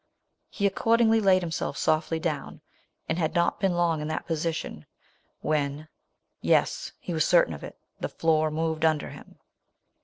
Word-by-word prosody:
He 200 - -2
accordingly 225 +3 +3
laid 190 -3 +4
himself 165 -2 -3
softly 155 +1 +1
down, 155 -4 -4 0.5
and 170 - -1
had 160 +1 -1
not 170 0 +2
been 190 -2 +1
long 170 -3 +1
in 150 - -3
that 155 - -3
position 160 - -3 0.5
when 150 0 -1 0.2
— - - -50 0.2
yes - - +1
— - - -44
he 175 - -5
was 160 -1 +2
certain 170 - +4
of 75 - -9
it - - -9
— - - -46
the - - -3
floor 155 -1 +2
moved 160 0 -2
under 155 -2 +1
him - - -13
160 Hz, 175 wpm, -27 LUFS, 155-175 Hz, 0.5 s, laid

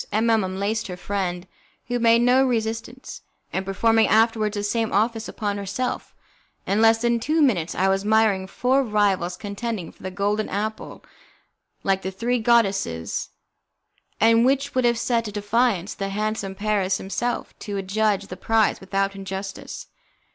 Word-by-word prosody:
M 225 +2 +2
M 220 -2 +3
unlaced 200 +4 -2
her 180 -2 -6
friend, 180 -2 -3 0.4
who 245 -1 -1
made 230 0 +4
no 250 +2 +5
resistance, 230 0 -3 0.3
and 190 - -1
performing 225 +4 +2
afterwards 220 -1 +2
the 205 - -2
same 225 +1 0
office 220 +2 0
upon 205 -1 -3
herself, 200 +6 -4 0.5
in 200 +3 +1
less 225 +1 +4
than 235 0 +2
two 305 +7 0
minutes 200 - +2
I 190 - +2
was 195 0 +2
admiring 210 -2 +2
four 255 +7 +1
rivals 200 -6 +1
contending 205 -3 -5
for - - -23
the 185 - -4
golden 205 +3 -1
apple 215 +2 -4 0.8
like 195 -1 +1
the 190 - -3
three 235 +6 -1
goddesses, 200 - +1 0.9
and 230 +2 +5
which 275 +2 +1
would 255 -1 +1
have 235 -1 +3
set 230 -1 0
at 210 - -8
defiance 205 -2 +1
the 195 0 -4
handsome 210 -1 -2
Paris 200 -2 0
himself 200 +6 -3
to 205 -2 -5
adjudge 200 +1 0
the 185 -2 -8
prize 225 +2 +2
without 195 +1 -1
injustice. 195 0 -6
210 Hz, 155 wpm, -23 LUFS, 195-230 Hz, 0.9 s, no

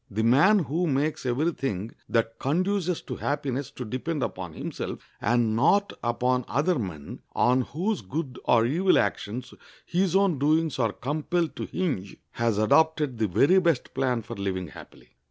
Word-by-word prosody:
The 110 +2 -1
man 145 - +5
who 170 +1 0
makes 145 -1 0
every 145 +8 +1
thing 110 - -3 0.2
that 115 -1 0
conduces 180 +4 0
to - - -6
happiness 140 -2 -2
to 125 - -7
depend 130 +6 -3
upon 90 -3 -5
himself, - - -5 0.2
and 120 -2 +2
not 200 - +3
upon 125 +2 +1
other 155 +2 +1
men, 80 -9 -6 0.2
on 125 +1 +3
whose 185 - -2
good 130 - -5
or 115 -2 +4
evil 175 +9 +3
actions 120 +5 -2 0.3
his 185 0 0
own 195 -7 +3
doings 155 0 +1
are 115 -3 +2
compelled 155 +7 -2
to - - -3
hinge, 135 - -3
has 115 -3 0
adopted 150 +3 +2
the 110 - +2
very 145 - +4
best 170 -8 0
plan 125 -4 0
for 115 +2 -7
living 95 -4 -3
happily. - - -14
135 Hz, 160 wpm, -26 LUFS, 115-165 Hz, 0.3 s, man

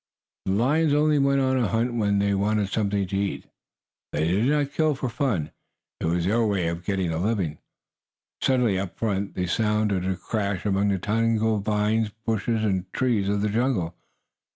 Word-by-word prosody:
The 95 - 0
lions 145 +8 +2
only 150 0 +3
went 140 0 +3
on 130 0 +2
a 120 - +2
hunt 115 +5 0
when 105 -3 +1
they 100 0 +2
wanted 100 +1 +1
something 100 -2 0
to 95 - -5
eat. 95 -8 -2 0.7
They 75 +2 0
did 95 +7 +2
not 145 -1 +1
kill 155 -2 +2
for 130 -1 -3
fun. 115 - -1 0.5
It - - -3
was 85 +1 0
their 115 +5 +2
way 100 -6 +1
of 85 +1 -5
getting 95 -2 -1
a 80 - -2
living. 95 -6 -1 0.8
Suddenly, 125 -7 +2
up 95 -2 -4
in - - -38
front, 100 -3 -2
there 90 - -1
sounded 105 0 0
a 95 - 0
crash 100 +1 -3
among 100 0 +2
the 100 - +1
tangled 110 +1 +1
vines, 105 +1 +1 0.2
bushes 115 0 0
and 95 -3 -1
trees 115 -7 +1
of 100 0 0
the 105 - +1
jungle. 105 -7 0
105 Hz, 185 wpm, -25 LUFS, 95-115 Hz, 0.8 s, only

